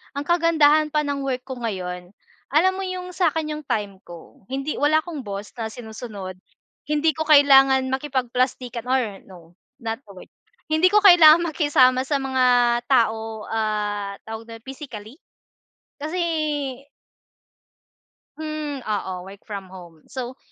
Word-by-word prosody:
Ang 285 +1 -3
kagandahan 310 -3 +4
pa 300 - +3
ng 280 -1 -2
work 255 -2 -2
ko 260 -2 -6
ngayon, 180 -5 -5 0.4
alam 370 +5 +4
mo 390 - -3
yung 365 -1 -5
sa'kin 320 -3 0
yung 305 - -10
time 205 -3 -2
ko. 170 +3 -14
Hindi 275 +3 -3
wala 305 +2 +3
akong 320 -6 -6
boss 200 0 -6
na 225 -1 -3
sinusunod. 215 -5 -8 0.5
Hindi 300 +1 +2
ko 315 - 0
kailangan 270 -3 +6
makipagplastikan 255 -3 -2
or 260 -1 +3 0.2
no, 185 -2 -13 0.4
not 225 +1 -3
the 200 - -14
word. 185 - -13 0.4
Hindi 315 +4 +4
ko 420 0 +5
kailangang 340 -3 +8
makisama 260 -5 +3
sa 285 - +1
mga 260 -1 0 0.4
tao, 225 -4 +1
ah, 210 -2 -2
tawag 225 +1 -8
dun, 225 - -11
physically. 260 -3 -9 0.8
Kasi 315 +5 -3 2.2
hmm, 305 -3 -5
oo, 190 -4 -3
work 195 +1 -12
from 200 -2 -5
home. 175 -4 -14
So, 255 -1 -7
260 Hz, 135 wpm, -23 LUFS, 215-300 Hz, 2.2 s, kailangang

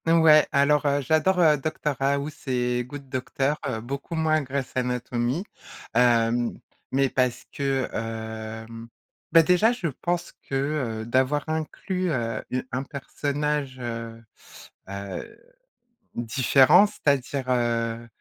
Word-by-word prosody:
Ouais, 160 -2 +6
alors, 145 +1 +3
heu, 140 0 +2
j'adore, 160 +7 +2
heu, 155 -3 +5
Doctor 150 0 -2
House 140 +2 -1
et 125 -1 0
Good 140 +1 -9
Doctor, 135 +3 -1
heu, 110 -4 -3
beaucoup 140 +7 -5
moins 155 -1 +2
Grey's 135 -1 -4
Anatomy, 125 +3 -1 0.5
hem, 120 0 +3 0.3
mais 135 +1 +3
parce 125 -2 0
que, 135 -2 -1
hem, 110 0 -6 0.4
bah, 165 +1 +7
déjà 180 +7 +4
je 240 -7 -5 0.2
pense 175 0 -1 0.2
que, 135 - -2 0.5
heu, - - -8
d'avoir 130 +5 +1
inclus, 180 +4 -2
heu, 115 -7 -2
u 130 0 -2
un 130 - -1
personnage, 145 0 -3
heu 115 -1 -6 0.7
heu, 100 -1 -7 0.8
différent. 130 - +5
C'est-à-dire, 140 -8 -1
heu 115 -2 0
135 Hz, 120 wpm, -25 LUFS, 120-150 Hz, 0.8 s, bah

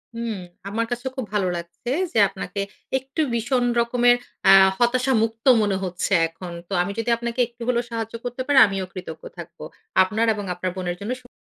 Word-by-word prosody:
হুম, 230 -1 -3 0.4
আমার 225 +3 -1
কাছে 245 +1 -3
খুব 260 -3 -3
ভালো 200 -3 +1
লাগছে, 170 +8 -8 0.2
যে - - -1
আপনাকে 200 +1 -5 0.4
একটু 270 +4 -3
ভীষণ 245 +2 +1 0.2
রকমের 245 +1 +4 0.3
আ - - +9 0.3
হতাশা 250 +2 +2
মুক্ত 225 0 -4 0.2
মনে 205 -2 +1
হচ্ছে 180 +1 -3 0.2
এখন। 165 +2 -9 0.2
তো 195 - -6
আমি 180 +3 -2
যদি 230 +1 -2
আপনাকে 235 +1 -4
একটু 235 0 -23
হলেও 245 -1 +1
সাহায্য 225 -1 -4
করতে 245 +1 -4
পারি। 285 - +3
আমিও 195 -1 -3
কৃতজ্ঞ 180 -4 -8
থাকব 170 0 -10 0.5
আপনার 210 +5 0
এবং 205 -1 -5
আপনার 180 +1 -3
বোনের 180 -2 -3
জন্য 205 +4 -4
শু 245 - -18
225 Hz, 185 wpm, -23 LUFS, 185-245 Hz, 0.5 s, আ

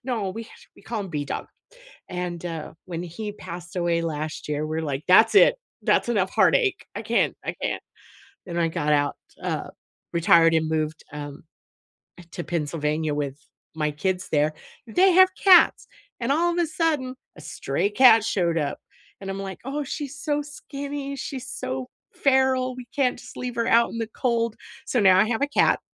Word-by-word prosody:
No, 225 -7 -2
we 225 +3 -6
ha - - -17 0.3
we - - -18
call 225 -2 -4
him 195 - -5
B-Dog, 145 -3 -4 0.6
and, 180 -1 -4
uh, 165 -3 -5
when 175 -1 -5
he 205 +5 -6
passed 175 -1 -9
away 170 -1 +1
last 155 -1 -4
year, 150 +1 -1
we're 160 +1 -2
like, 145 -1 -3
"That's 185 +5 +6
it, 485 - +7 0.3
that's - - +2
enough 195 -5 +1
heartache, 415 -5 +3
I - - -3
can't, - - +1
I - - -2
can't." - - -2 0.6
Then 175 -2 -5
I 170 -1 +2
got 150 -3 -1
out, 145 -1 +1 0.3
uh, - - -3 0.4
retired 165 -1 +5
and 160 -1 +2
moved, 155 0 -2
um, 145 -1 -7 0.8
eh, - - -11
to 175 - -5
Pennsylvania 155 -2 -1
with 145 -1 -3 0.4
my 150 -1 0
kids 185 +5 -2
there, 150 0 +2 0.3
they 370 +12 +4
have 375 +1 +7
cats, 375 -3 +6 0.3
and 240 +3 -1
all 345 +4 +2
of 345 - -3
the 345 -1 +2
sudden, 300 -5 -1 0.2
a - - -11
stray 150 +6 -2
cat 225 0 +6
showed 175 -6 0
up, 145 -2 -1 0.4
and 195 - -6
I'm 195 - -5
like, 195 -1 -6
"Oh, 290 +2 -2
she's 285 0 -6
so 295 -1 -1
skinny, 285 -1 -6
she's 265 -1 -6
so 130 0 -4 0.2
feral, 260 -1 +2
we 250 -1 -8
can't 265 -3 +1
just - - -12
leave 250 -1 -4
her 230 -1 0
out 235 -1 +4
in - - -6
the 225 -1 -2
cold." 230 -3 0 0.3
So 245 - 0
now 190 -2 +6
I 205 - +5
have 230 +2 -1
a 285 - +2
cat, 290 - +3
195 Hz, 185 wpm, -24 LUFS, 160-260 Hz, 0.8 s, it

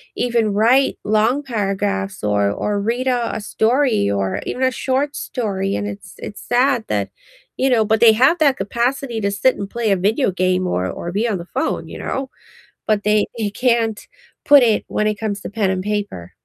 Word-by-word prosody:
even 230 -4 0
write 245 +6 +3
long 220 +7 +1
paragraphs 195 - -2
or 100 -1 +1
or 205 - -2
read 240 +5 -1
a 245 -2 0
a 215 - -4
story 225 - +1
or 100 -1 -1
even 260 - -3
a 260 - +3
short 275 +4 -1
story, 195 -5 -2
and 100 0 -2
it's 100 -1 -8
it's 210 - -8
sad 245 -1 +2
that 100 -2 -1 0.5
you 265 +1 +2
know, 230 -3 +3
but 220 0 +2
they 225 -1 +7
have 265 +9 +3
that 280 -4 +4
capacity 235 +4 -2
to 200 0 0
sit 255 +6 +2
and 200 -1 -5
play 235 -3 -1
a 195 - +3
video 210 +4 +1
game 185 0 0
or 95 - -1
or 175 - -5
be 215 +5 0
on 205 -4 -1
the 170 - -8
phone, - - -2
you - - -8
know, 265 0 -3 0.6
but 210 -2 +1
they 210 0 +3
they 210 -2 -1
can't 230 -1 0 0.4
put 285 -3 +7
it 220 -3 +2
when 215 - 0
it 210 -1 -2
comes 205 -3 -3
to - - -6
pen 205 -2 0
and 185 0 -1
paper. 205 - -4
215 Hz, 200 wpm, -19 LUFS, 195-245 Hz, 0.6 s, they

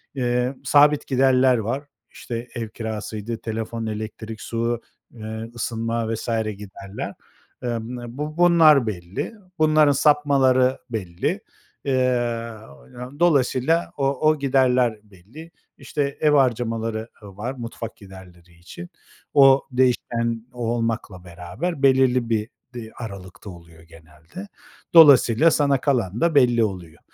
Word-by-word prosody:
eee, 125 +1 -1
sabit 145 +2 +4
giderler 130 -1 +3
var. 120 +6 -3 0.3
İşte, 120 +1 -6
ev 115 -2 -4
kirasıydı, 110 0 -5
telefon, 115 0 -4
elektrik, 110 0 -6
su, 115 0 -2 0.3
eee, 110 0 -7
ısınma, 115 -1 -2
vs. 110 - -6 0.3
giderler. 100 -1 -8 0.5
Eee 120 -1 -2
m 120 +1 -8
bu 150 +2 -5
bunlar 160 -8 +5
belli. 90 - -5 0.3
Bunların 155 -2 +4
sapmaları 135 -3 +3
belli. 95 -7 -3 0.4
Eee, 130 -2 +1 1.0
dolayısıyla 160 0 +2
o 135 - 0 0.2
o 155 -2 +1
giderler 125 -4 +2
belli. 105 - -14 0.3
İşte, 140 -2 -3
ev 150 -1 +4
harcamaları 115 -4 0
ı 100 -1 -13
var 120 +5 -4
mutfak 115 -2 -7
giderleri 90 -3 -15
için. 85 0 -11 0.4
O 135 -1 +6
değişken 120 -2 0
olmakla 115 -5 -3
beraber 90 - -6
belirli 130 -3 +3
bir 110 +1 -1 0.2
di 115 -2 -8
aralıkta 100 -2 -9
oluyor 85 -2 -14
genelde. 80 - -13 0.5
Dolayısıyla 150 -1 +7
sana 140 -3 +1
kalan 115 -7 -1
da 170 -3 +2
belli 120 -4 +4
oluyor. 90 -6 -5
120 Hz, 115 wpm, -22 LUFS, 110-135 Hz, 1.0 s, Dolayısıyla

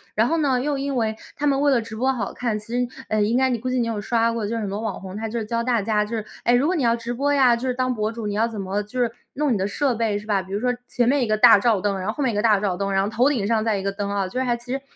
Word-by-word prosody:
然 220 +2 +3
后 330 +4 +1
呢， 270 -5 +2
又 280 +1 -1
因 275 -1 -2
为 220 -2 0 0.2
她 295 - -3
们 275 -1 +2
为 290 0 +4
了 255 - +4
直 220 -1 -7
播 260 +4 +1
好 230 -7 -3
看， 235 -4 -2
其 210 - -8
实， 245 0 +1 0.2
呃， 215 0 +1
应 225 +4 +2
该 260 0 +3
你 235 - -1
估 255 - -3
计 255 0 0
你 235 - +1
有 225 -3 -3
刷 230 +1 +1
过， 225 -3 -2
就 230 - -2
是 230 - -2
很 205 - -2
多 200 +3 -4
网 220 -4 -3
红， 190 +1 -8
她 220 +1 -4
就 235 - -4
是 220 - -2
教 230 +1 -1
大 240 -2 +1
家 210 0 +1
就 225 +2 -4
是： 215 - -4 0.2
“哎， 240 - +3
如 250 +3 +2
果 365 +4 +1
你 310 - 0
要 235 -2 +3
直 235 +1 -5
播 280 +4 0
呀， 260 -4 +5
就 245 +3 -4
是 250 - -1
当 255 0 0
博 215 -2 -1
主， 230 -1 -6
你 205 - -2
要 220 +3 +1
怎 220 -3 -7
么 195 +1 -2
就 210 +5 -6
是 240 -2 +1 0.2
弄 290 -2 +1
你 210 - +1
的 190 - 0
设 270 +5 0
备 220 -3 0
是 210 - -8
吧？” 200 -3 +1
比 190 +1 -13
如 200 - 0
说 250 +2 +1
前 240 -1 0
面 280 +2 +3
一 - - -1
个 215 0 +1
大 225 -2 +8
照 220 -2 +2
灯， 200 -1 -1
然 185 - -4
后 215 - -1
后 290 - -2
面 235 - +1
一 - - -4
个 210 - +1
大 215 -3 +4
照 195 -3 -1
灯， 200 0 -2
然 195 0 +2
后 200 - -1
头 240 +6 +3
顶 230 -9 0
上 220 0 +1
再 220 -3 +1
一 190 - -4
个 195 - -1
灯 200 0 -4
啊。 200 -1 -1
就 220 +8 -4
是 - - +1
还 240 -2 0
其 240 +1 -10
实 270 - -2
230 Hz, 400 characters per minute, -23 LUFS, 210-250 Hz, 0.2 s, 大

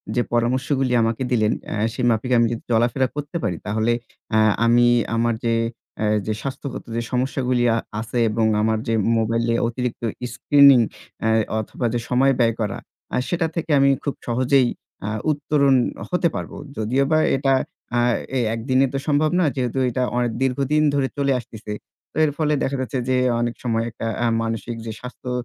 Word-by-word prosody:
যে 125 - +3
পরামর্শগুলি 130 +2 +1
আমাকে 115 +3 -1
দিলেন, 110 -3 +2 0.2
অ্যা - - -4 0.2
সে 125 - -4
মাফিক 115 +3 -1
আমি 115 - +4
যদি 115 - -5
চলাফেরা 120 +3 +2
করতে 145 +3 -4
পারি 90 -6 -1
তাহলে, 110 +3 0 0.4
অ্যা 110 - +3 0.3
আমি 120 +1 +5 0.3
আমার 115 +1 +1
যে, 115 - +2 0.4
অ্যা 110 - -1 0.2
যে 110 - -1
স্বাস্থ্যগত 135 0 -5
যে 115 - 0
সমস্যাগুলি 125 -1 0
আ - - +1 0.2
আছে 115 +2 -3
এবং 110 +1 +1 0.2
আমার 110 0 +2
যে 115 - +1 0.2
মোবাইলে 115 +1 +1
অতিরিক্ত 125 0 -3 0.3
screening, 140 -2 +6 0.4
অ্যা 110 - +2 0.3
অথবা 110 +3 -4
যে 120 - 0
সময় 130 +2 +4
ব্যয় 115 -1 +3
করা। 105 -3 -2 0.4
আ - - +1
সেটা 170 -2 0
থেকে 165 -1 -2
আমি 140 0 +5
খুব 140 - -1
সহজেই, 130 +2 +3 0.3
অ্যা 105 - -3 0.2
উত্তরণ 140 -2 +2 0.3
হতে 180 -1 +2
পারবো। - - -5 0.2
যদিওবা 135 +8 +1 0.2
এটা, 135 0 +2 0.4
অ্যা 120 0 +2 0.4
এ - - +2 0.2
একদিনে 130 +3 +2
তো - - 0
সম্ভব 150 +1 +3
নয়। 160 -6 +2
যেহেতু 130 -1 -1
এটা 125 +1 -1
অয়ে 120 -1 +1
দীর্ঘদিন 140 +3 +1
ধরে 140 -2 +1
চলে 140 -1 +1
আসতেছে। 110 -2 -9 0.4
তো - - -11
এর 150 - 0
ফলে 150 -1 +1
দেখা 135 +1 -1
যাচ্ছে 130 +1 -3
যে 130 - +3 0.3
অনেক 120 0 -1
সময় 115 -2 0
একটা, 115 0 -5
অ্যা 120 - +1 0.2
মানসিক 115 +1 -3
যে 110 - -4
স্বাস্থ্য 125 0 -8
125 Hz, 175 wpm, -22 LUFS, 115-135 Hz, 0.4 s, screening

